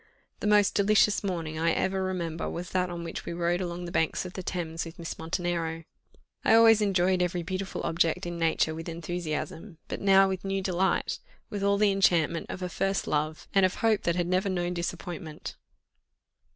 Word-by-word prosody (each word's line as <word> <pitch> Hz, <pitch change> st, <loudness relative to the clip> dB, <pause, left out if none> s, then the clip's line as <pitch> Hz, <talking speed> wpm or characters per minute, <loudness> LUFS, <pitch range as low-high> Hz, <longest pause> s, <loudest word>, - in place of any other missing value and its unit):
The -, -, -2 dB
most 210 Hz, -1 st, +4 dB
delicious 210 Hz, +1 st, +3 dB
morning 165 Hz, -5 st, -3 dB
I 165 Hz, +1 st, +2 dB
ever 190 Hz, 0 st, 0 dB
remember 170 Hz, -3 st, -3 dB
was 175 Hz, +1 st, -6 dB
that 180 Hz, -1 st, +1 dB
on 170 Hz, -1 st, -5 dB
which 165 Hz, -, -5 dB
we -, -, -5 dB
rowed 175 Hz, +1 st, 0 dB
along 175 Hz, 0 st, -4 dB
the 170 Hz, -, -6 dB
banks 160 Hz, +2 st, 0 dB
of 180 Hz, -, -7 dB
the 185 Hz, -, -5 dB
Thames 170 Hz, -3 st, -3 dB
with 165 Hz, -1 st, -9 dB
Miss 165 Hz, -1 st, -6 dB
Montenero. 165 Hz, -1 st, -2 dB, 0.6 s
I 225 Hz, -, +5 dB
always 225 Hz, -1 st, +7 dB
enjoyed 185 Hz, -2 st, +2 dB
every 180 Hz, -1 st, 0 dB
beautiful 190 Hz, +3 st, -4 dB
object 165 Hz, 0 st, +1 dB
in 175 Hz, -1 st, -4 dB
nature 160 Hz, -1 st, +2 dB
with 165 Hz, +2 st, -6 dB
enthusiasm, 165 Hz, +1 st, -4 dB
but -, -, -5 dB
now 195 Hz, 0 st, +6 dB
with 190 Hz, -1 st, -3 dB
new 195 Hz, 0 st, -1 dB
delight 185 Hz, 0 st, 0 dB, 0.3 s
with 205 Hz, -, -3 dB
all 200 Hz, 0 st, +3 dB
the 205 Hz, 0 st, +4 dB
enchantment 175 Hz, -4 st, +2 dB
of 185 Hz, -, -5 dB
a -, -, -1 dB
first 195 Hz, +2 st, -1 dB
love, 155 Hz, +1 st, -2 dB
and 195 Hz, -, +4 dB
of 185 Hz, -, +3 dB
hope 220 Hz, -3 st, +2 dB
that 170 Hz, -, 0 dB
had 175 Hz, -1 st, 0 dB
never 185 Hz, +2 st, +1 dB
known 175 Hz, -1 st, -1 dB
disappointment. 170 Hz, -2 st, -5 dB
180 Hz, 190 wpm, -28 LUFS, 165-195 Hz, 0.6 s, always